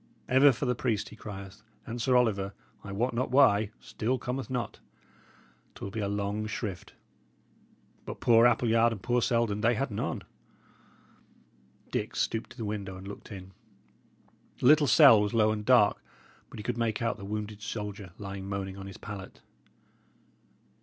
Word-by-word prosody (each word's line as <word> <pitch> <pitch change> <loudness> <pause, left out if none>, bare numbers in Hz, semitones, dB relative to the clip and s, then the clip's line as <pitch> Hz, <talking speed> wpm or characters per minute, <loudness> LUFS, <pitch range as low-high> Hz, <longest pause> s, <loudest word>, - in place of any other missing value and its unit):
Ever 135 +2 +6
for 130 +3 -3
the 125 - +2
priest 115 -4 -1
he - - -12
crieth, 100 -3 -9 0.2
and 120 0 -5
Sir 125 +2 +2
Oliver, 100 -5 +1 0.3
I 100 - -7
wot 120 +6 -1
not 125 +3 -1
why, 110 -6 +4
still 125 +4 -2
cometh 125 +2 -4
not. 125 -2 -3 1.0
'Twill 100 - -7
be 110 - -4
a 100 - -1
long 100 +1 -2
shrift; 105 -4 -5 1.1
but - - -7
poor 115 0 +6
Appleyard 115 -1 +3
and 100 -4 -9
poor 120 +3 +1
Selden, 115 -3 +1
they 115 +2 +3
had 135 +1 -2
none." 100 - -3 1.7
Dick - - -2
stooped 115 0 -1
to - - -15
the 115 - -4
window 100 -3 -4
and 95 +1 -10
looked 100 +3 -10
in. 95 -2 -9 1.1
The - - -3
little 150 +2 +6
cell 125 -4 +8
was 105 +2 -1
low 110 -1 +4
and 105 -1 -3
dark, 105 - +4 0.5
but - - -11
he 105 - -6
could 120 0 -3
make 115 -1 0
out 115 - 0
the 100 - -10
wounded 105 0 -5
soldier 105 -3 -6
lying 100 -1 -6
moaning 95 -1 -4
on 95 0 -8
his 95 - -9
pallet. 100 -2 -9
110 Hz, 165 wpm, -29 LUFS, 100-120 Hz, 1.7 s, cell